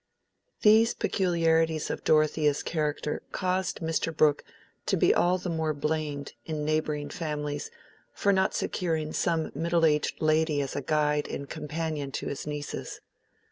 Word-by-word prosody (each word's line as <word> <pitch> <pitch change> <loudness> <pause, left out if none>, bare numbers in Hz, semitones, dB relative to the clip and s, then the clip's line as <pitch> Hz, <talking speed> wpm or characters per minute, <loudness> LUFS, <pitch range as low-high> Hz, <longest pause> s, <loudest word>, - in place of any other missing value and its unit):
These 220 +2 +6
peculiarities 165 -4 +1
of - - -5
Dorothea's 155 -1 +3
character 150 -2 -2
caused 185 0 -1
Mr. 165 0 0
Brooke 150 -2 +3 0.4
to - - +2
be - - +4
all 180 +1 +3
the 185 - -6
more 160 -2 -1
blamed 150 -1 -2
in 155 -2 -3
neighboring 155 -1 -1
families 150 -2 -3 0.4
for 200 - +2
not 190 0 +2
securing 160 -3 -1
some 165 -2 0
middle 170 0 +2
aged 150 -2 +1
lady 155 -1 +2
as 140 -1 -3
guide 150 -1 +1
and 140 - -5
companion 150 -2 -4
to - - -3
his 140 - -5
nieces. 150 -1 -5
155 Hz, 140 wpm, -28 LUFS, 150-165 Hz, 0.4 s, These